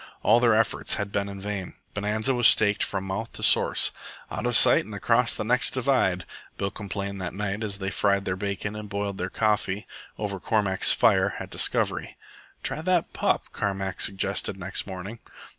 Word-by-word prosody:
All 120 - +5
their 120 -2 +4
efforts 115 0 +1
had 100 -1 -4
been 100 -1 -3
vain. 100 -2 -5 0.2
Bonanza 105 +5 0
was 120 -2 +5
staked 105 -1 +4
from 95 -1 -2
mouth 95 +4 -4
to - - -8
source, - - +4 0.4
"out - - -3
of - - +3
sight - - +7
and 105 +1 -9
across 115 +3 +2
the - - -3
next 125 +4 +1
divide." 125 -9 +1 0.3
Bill 100 0 -2
complained 100 -1 -5
that 90 0 -5
night 105 +1 -3
as 100 -2 -3
they 95 0 -3
fried 100 -1 +1
their 90 - -1
bacon 100 +2 -4
and 105 -1 -7
boiled 100 -1 -3
their 90 - -2
coffee 105 -1 0 0.3
over 100 -2 -4
Cormack's 100 -2 +4
fire - - +3
at - - -8
Discovery. - - 0 0.5
"Try 155 - -2
that 180 0 0
pup," - - +1
Carmack 95 -2 -3
suggested 95 0 -2
next 95 +1 -5
morning. 95 +4 -7
100 Hz, 175 wpm, -25 LUFS, 95-110 Hz, 0.5 s, sight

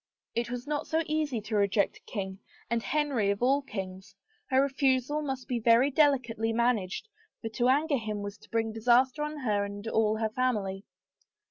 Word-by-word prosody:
It 235 0 -1
was 245 +1 -5
not 295 0 -2
so 320 +1 +1
easy 305 -7 -1
to 215 +1 -4
reject 200 -1 +2
a - - -19
king 190 -3 -4 0.3
and 235 0 +1
Henry 280 -7 0
of 200 +3 -1
all 275 +3 +4
kings; 195 -5 -7 0.3
her 260 -1 +4
refusal 275 +1 +1
must 270 -3 -4
be 245 -2 -1
very 235 +5 +4
delicately 250 -6 +2
managed 230 - 0 0.3
for 225 - -4
to 240 +3 +1
anger 285 +1 +2
him 215 -2 -4
was 205 0 -6
to - - -19
bring 225 -1 0
disaster 245 +5 +3
on 300 0 -3
her 210 -5 +1
and 200 +2 -6
all 220 -1 +2
hef 220 -1 -1
family. 210 -6 -1
235 Hz, 185 wpm, -29 LUFS, 210-270 Hz, 0.3 s, all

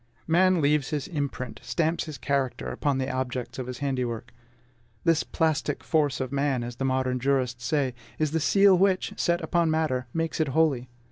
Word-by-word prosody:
Man 180 +1 +4
leaves 145 -1 +2
his 150 -3 -2
imprint, 140 -7 -4
stamps 165 0 0
his 155 -4 -7
character, 140 -3 -1
upon 140 -2 0
the 130 0 -1
objects 125 -1 -3
of 125 - -4
his 125 -1 -5
handiwork. 120 -3 -2 0.7
This 165 -1 +3
plastic 155 -2 -1
force 150 -4 +1
of 130 -1 -3
man, 140 -3 0
as 120 0 -6
the 135 - -1
modern 130 -1 0
jurists 125 -2 0
say, 135 -2 +1 0.2
is 155 -2 0
the 160 - +1
seal 195 +4 +5
which, 190 0 +2
set 170 0 +1
upon 170 -2 +1
matter, 155 -5 0
makes 165 0 -2
it 160 - +2
holy. 135 -4 +1
140 Hz, 180 wpm, -26 LUFS, 130-160 Hz, 0.7 s, seal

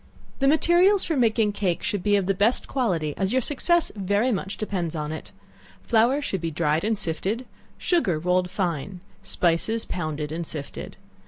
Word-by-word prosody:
The 275 - +3
materials 345 +6 +4
for 325 - -1
making 225 -4 +2
cake 190 -4 -1
should 205 -3 -1
be 205 +2 +2
of 200 -2 +1
the 195 - +2
best 205 +6 +1
quality, 175 - -1
as 195 0 0
your 260 +1 +2
success 340 +5 +1
very 205 +5 +1
much 195 -2 -3
depends 180 -6 -3
on 150 -1 -3
it. 160 - -7 0.5
Flour 240 +5 +3
should 190 - -2
be 165 - -1
dried 155 +1 0
and 220 +1 0
sifted, 200 +7 -2 0.3
sugar 320 - +1
rolled 180 +2 +1
fine, 180 -1 -3 0.2
spices 195 +4 +1
pounded 155 -3 -4
and 165 0 -4
sifted. 145 -3 -7
195 Hz, 170 wpm, -25 LUFS, 170-235 Hz, 0.5 s, materials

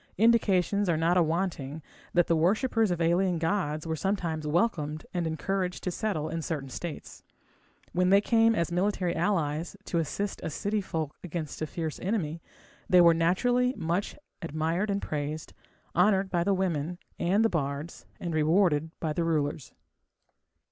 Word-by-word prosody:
Indications 205 -3 +3
are 165 - +2
not 165 +2 +2
awanting 160 -4 0 0.3
that 175 -1 +5
the 165 - +2
worshippers 215 +6 +2
of 175 -2 -1
alien 175 +2 +2
gods 160 -3 -1
were 160 -1 -1
sometimes 165 -4 -2
welcomed 155 -3 0
and 175 -2 -1
encouraged 180 +3 -2
to 180 - -1
settle 175 -6 -2
in 165 - -3
certain 145 -4 -4
states. 165 +4 -7 0.7
When 180 +1 +2
they 195 +1 +7
came 225 +1 +3
as 170 -4 0
military 180 -1 0
allies 165 -1 -1
to 170 - 0
assist 195 +6 -3
a - - -3
city 205 +7 -1
folk 160 -6 -4
against 165 -4 -5
a 155 - -1
fierce 160 -1 -4
enemy, 170 -5 -2 0.5
they 180 - +6
were 170 -1 +7
naturally 245 +10 +2
much 175 +2 -1 0.3
admired 165 +5 -1
and 200 0 -1
praised, 150 +1 -4 0.4
honoured 190 +1 +3
by 175 -1 +2
the 195 +1 +2
women 175 -3 -1 0.2
and 195 +6 +3
the - - +4
bards, 145 -1 -3
and 170 -2 -3
rewarded 160 0 +3
by 155 -2 -1
the 170 - 0
rulers. 150 -4 -1
170 Hz, 155 wpm, -28 LUFS, 160-195 Hz, 0.7 s, they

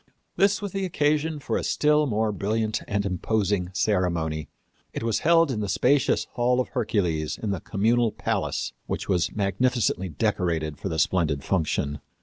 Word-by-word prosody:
This 200 +1 +2
was 200 - -3
the 195 +1 -2
occasion 155 -2 +1
for 145 - -2
a - - -3
still 150 0 +2
more 110 -2 0
brilliant 110 +2 -1
and 100 0 -1
imposing 100 -1 0
ceremony. 85 -6 0 0.4
It - - -4
was 115 -2 +1
held 165 -2 +4
in 115 - -2
the 105 -2 -2
spacious 135 +4 +2
Hall 125 +1 +1
of 125 - -1
Hercules 85 -8 -1
in 105 - -3
the 95 - -2
Communal 115 +3 +1
Palace, - - -2
which - - -3
was 90 -4 +1
magnificently 105 -1 0
decorated 80 0 -1
for 95 - -3
the 80 - -3
splendid 80 -4 +1
function. 75 -5 -1
105 Hz, 160 wpm, -25 LUFS, 90-125 Hz, 0.4 s, held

